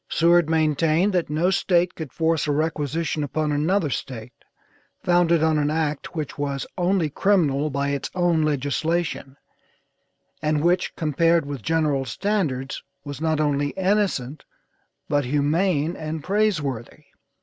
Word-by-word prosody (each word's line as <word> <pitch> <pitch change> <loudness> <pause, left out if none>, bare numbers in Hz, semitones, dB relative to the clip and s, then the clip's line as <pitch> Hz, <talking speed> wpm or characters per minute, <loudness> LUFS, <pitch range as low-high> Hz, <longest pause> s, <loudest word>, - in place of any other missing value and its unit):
Seward 170 -1 +3
maintained 160 +4 +2
that 175 -4 0
no 165 +5 +1
State 175 -1 +2
could 160 -5 -7
force 160 -1 0
a - - +1
requisition 155 +1 -1
upon 150 +1 -1
another 155 +2 +1
State, 125 -1 -5 0.7
founded 170 -2 +3
on 160 -1 +3
an 145 0 +1
act 155 0 -2
which 150 -3 -5
was 140 -2 -2
only 180 -2 +1
criminal 155 -4 +1
by 140 0 -1
its 140 -1 -2
own 175 -3 +2
legislation, 150 0 -1 1.0
and 150 -1 0
which 180 +1 +1
compared 165 +1 +2
with 140 -3 -5
general 150 -1 +1
standards 140 - -2 0.2
was 145 0 -7
not 160 -1 +1
only 145 -1 +1
innocent, 190 -8 0 0.6
but 145 0 +1
humane 150 +4 +1
and 155 -1 -5
praiseworthy. 160 - -1
155 Hz, 130 wpm, -23 LUFS, 145-170 Hz, 1.0 s, Seward